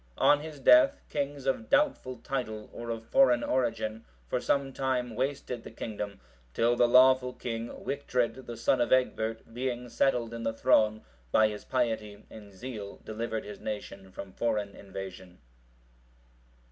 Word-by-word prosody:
On 145 - +5
his 150 -1 -8
death, 290 - +6
kings 140 -1 -3
of 185 - -1
doubtful 280 - +2
title, 110 -6 -4
or 120 0 -7
of 115 -1 -4
foreign 125 -2 +4
origin,(737) 110 - -2
for - - 0
some 140 -1 0
time 125 -3 -1
wasted 130 -1 -2
the - - -8
kingdom, 105 -3 -6 0.4
till 120 +1 +3
the 120 0 +4
lawful 125 +1 +5
king, 115 -1 -4
Wictred,(738) 130 -2 -2
the 120 - -6
son 120 +2 +2
of 120 - 0
Egbert, 115 -3 0
being 125 0 -3
settled 120 -2 +1
in 115 - -5
the 115 0 -1
throne, 110 -1 +3 0.3
by 110 0 +5
his 105 -1 -7
piety 110 -5 -2
and 105 -2 -11
zeal 105 -1 -7
delivered 110 0 -3
his 105 0 -8
nation 100 -2 -6
from 95 0 -9
foreign 105 -4 -1
invasion. 95 -2 -9
115 Hz, 150 wpm, -29 LUFS, 110-130 Hz, 0.4 s, death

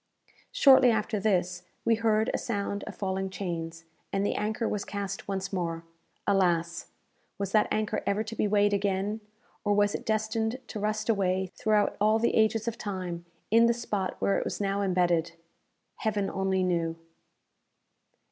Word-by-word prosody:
Shortly 265 -3 +7
after 215 -1 0
this, 180 -3 0 0.2
we 230 - +4
heard 220 0 +2
a - - +1
sound 200 -3 -3
of 210 - -8
falling 190 0 -2
chains, 165 -4 -5 0.3
and 195 +1 0
the - - +1
anchor 220 +2 -1
was 205 -1 -2
cast 200 -1 -5
once 195 0 -3
more. 165 -3 -2 0.4
Alas! 175 -4 +1 0.5
was 200 -1 -3
that 215 0 +4
anchor 215 0 -1
ever 205 +2 +1
to 225 +1 -7
be 210 - +1
weighed 205 0 +3
again, 200 +2 0 0.4
or 205 -1 +2
was 205 0 +3
it - - -4
destined 220 +2 -1
to 215 - -5
rust 215 +1 -1
away 190 -4 +1
throughout 215 -1 +1
all 215 +1 +4
the 235 +1 +1
ages 220 0 +2
of 235 0 -3
time, 180 -4 -4 0.3
in 230 +1 +6
the 235 - +2
spot 205 -5 -2
where 200 - +2
it - - -2
was - - -4
now 200 0 0
imbedded? 175 -3 +1 0.6
Heaven 205 -3 -1
only 190 -1 0
knew! 170 -2 0
200 Hz, 165 wpm, -28 LUFS, 190-215 Hz, 0.6 s, Shortly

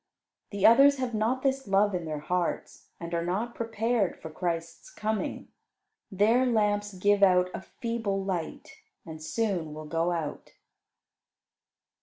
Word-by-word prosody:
The 200 -2 -1
others 275 +5 +7
have 255 -2 -3
not 225 +4 0
this 270 -2 0
love 200 +1 +3
in 175 -2 -2
their 155 -2 -4
hearts, 180 +2 -3
and 170 0 -7
are 170 0 0
not 205 +7 -2
prepared 225 -2 -1
for 160 - -8
Christ's 170 - -4
coming. 215 - -3 0.6
Their 215 +6 +3
lamps 205 -3 +1
give 205 +2 +2
out 180 -2 +4
a - - -5
feeble 225 -4 -3
light 180 -4 -5 0.3
and 160 -1 -9
soon 170 -3 -2
will 155 0 -8
go 165 +3 0
out. 160 -4 -5
200 Hz, 140 wpm, -28 LUFS, 170-225 Hz, 0.6 s, others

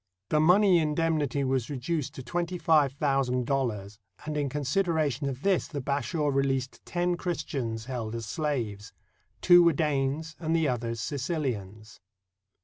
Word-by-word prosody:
The 155 - +3
money 180 +3 +5
indemnity 150 -3 0
was 130 -3 0
reduced 145 +2 -3
to 130 - -7
twenty 175 +7 -2
five 155 -5 +3
thousand 135 -3 0
dollars, 110 -6 -2 0.3
and 155 0 -3
in 145 -2 0
consid 150 +7 0
eration 150 -4 0
of 130 +1 -7
this 195 -3 +2
the 145 - -5
Bashaw 145 +3 -1
released 135 -1 -1
ten 175 0 0
Christians 140 -10 -3
held 120 -4 -4
as 115 -1 -4
slaves. 110 -7 -3 0.5
Two 175 -1 +7
were 170 -1 +5
Danes 150 +1 -1
and 160 -1 0
the 160 -2 +2
others 115 -2 -2
Sicilians. 120 - -4
140 Hz, 145 wpm, -28 LUFS, 125-160 Hz, 0.5 s, Two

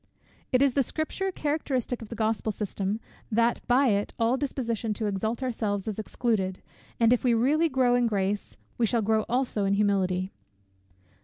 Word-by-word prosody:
It 255 +1 +4
is 275 -3 +3
the 275 - +3
Scripture 315 +8 -2
characteristic 285 -7 -2
of 220 - -9
the 230 - -6
Gospel 220 0 0
system, 205 0 -3 0.3
that 230 +2 +2
by 255 +2 +4
it 205 -1 0
all 230 +2 +2
disposition 235 -6 -2
to 215 - -2
exalt 220 +5 -2
ourselves 215 -5 -2
is 215 -1 -3
excluded; 210 -4 -1 0.4
and 230 0 +5
if 250 - 0
we 245 -2 +3
really 300 +8 +3
grow 260 -3 +3
in 245 -1 +3
grace, 200 -1 -2 0.2
we 230 - +3
shall 230 0 +1
grow 220 0 +2
also 245 -4 0
in 195 0 +2
humility. 190 -2 +1
230 Hz, 170 wpm, -27 LUFS, 205-255 Hz, 0.4 s, and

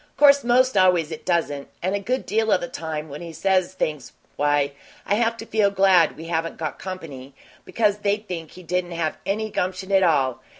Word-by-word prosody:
'Course, 280 -1 +6
most 255 +2 +3
always 180 -4 +3
it 160 - -8
doesn't, 160 -5 0 0.2
and 185 +2 0
a 200 - 0
good 250 +6 -2
deal 220 +1 +1
of - - +4
the 175 - -4
time, 160 -2 -5
when 145 +1 -8
he 170 -1 -7
says 185 +3 0
things, 150 -8 -3 0.2
why, 145 -1 +1 0.3
I - - 0
have 230 +1 +1
to 225 - -8
feel 215 -3 +2
glad 190 -4 +4
we 160 - -8
haven't 165 0 -2
got 155 -2 -4
company, 145 -8 -8 0.3
because 210 -3 +1
they'd 210 +1 -1
think 165 -4 -5
he 185 - -13
didn't 175 +1 -2
have 165 -2 -2
any 215 +2 -1
gumption 185 +1 -3
at 195 -1 +5
all. 140 -8 +2
180 Hz, 205 wpm, -23 LUFS, 160-205 Hz, 0.3 s, Course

